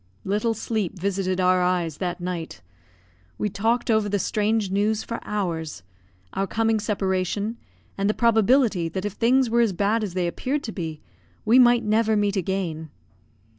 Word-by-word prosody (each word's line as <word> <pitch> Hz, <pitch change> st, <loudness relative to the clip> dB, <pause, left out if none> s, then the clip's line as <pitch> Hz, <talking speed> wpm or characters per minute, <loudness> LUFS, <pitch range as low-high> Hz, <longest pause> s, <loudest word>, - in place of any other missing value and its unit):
Little 210 Hz, +4 st, 0 dB
sleep 215 Hz, -4 st, -3 dB
visited 190 Hz, 0 st, -1 dB
our 185 Hz, 0 st, +3 dB
eyes 180 Hz, -4 st, 0 dB
that 180 Hz, -1 st, -3 dB
night. 175 Hz, -, -5 dB, 0.8 s
We 210 Hz, -, -1 dB
talked 230 Hz, +5 st, 0 dB
over 220 Hz, -2 st, +2 dB
the 205 Hz, -, +1 dB
strange 210 Hz, +1 st, 0 dB
news 210 Hz, +2 st, +1 dB
for 230 Hz, -, -5 dB
hours; 165 Hz, -, -3 dB, 0.5 s
our 195 Hz, -, -1 dB
coming 225 Hz, +2 st, +1 dB
separation, 205 Hz, +1 st, -1 dB, 0.4 s
and 200 Hz, +1 st, +1 dB
the 215 Hz, -, +1 dB
probability 225 Hz, -5 st, +3 dB
that 190 Hz, +4 st, -4 dB
if 205 Hz, -, -3 dB
things 250 Hz, +4 st, +3 dB
were 235 Hz, +1 st, +2 dB
as 225 Hz, -4 st, +2 dB
bad 205 Hz, +5 st, +1 dB
as 190 Hz, -4 st, -4 dB
they 180 Hz, -1 st, 0 dB
appeared 265 Hz, +11 st, -2 dB
to 220 Hz, -, -4 dB
be, 160 Hz, -6 st, -5 dB, 0.4 s
we 240 Hz, +4 st, +6 dB
might 240 Hz, -1 st, +5 dB
never 220 Hz, 0 st, +2 dB
meet 205 Hz, -1 st, +1 dB
again. 175 Hz, -4 st, -2 dB
205 Hz, 165 wpm, -24 LUFS, 185-225 Hz, 0.8 s, we